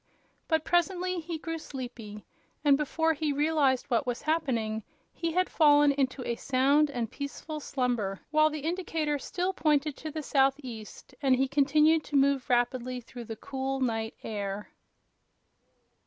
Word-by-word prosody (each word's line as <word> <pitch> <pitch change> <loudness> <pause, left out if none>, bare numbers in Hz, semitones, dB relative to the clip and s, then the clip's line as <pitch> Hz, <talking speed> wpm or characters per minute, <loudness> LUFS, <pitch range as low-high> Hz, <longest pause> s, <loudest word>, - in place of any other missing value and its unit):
But 320 -2 +1
presently 360 +1 +1
he 330 0 -5
grew 330 +1 -5
sleepy, 240 -8 -8 0.4
and 285 -1 +7
before 320 +3 +1
he 305 -1 -1
realized 290 -3 +2
what 250 0 0
was 245 -1 -2
happening 245 -9 0 0.3
he 335 -1 -2
had 365 +1 +2
fallen 290 -2 +5
into 270 -2 -1
a 235 - 0
sound 275 +4 +3
and 240 -5 -3
peaceful 300 +2 -6
slumber, 245 -9 -1
while 310 0 +5
the 305 -1 -5
indicator 320 -3 -1
still 365 +6 -2
pointed 300 -4 +1
to 315 - -6
the 310 0 -5
southeast 265 -5 -1
and 265 -3 +4
he 265 +1 +1
continued 300 +3 +3
to 290 - -5
move 275 -1 +3
rapidly 250 +1 +1
through 240 0 -10
the 225 - -6
cool 270 +3 -3
night 225 -3 -1
air. 205 -1 -4
280 Hz, 150 wpm, -29 LUFS, 250-310 Hz, 0.4 s, and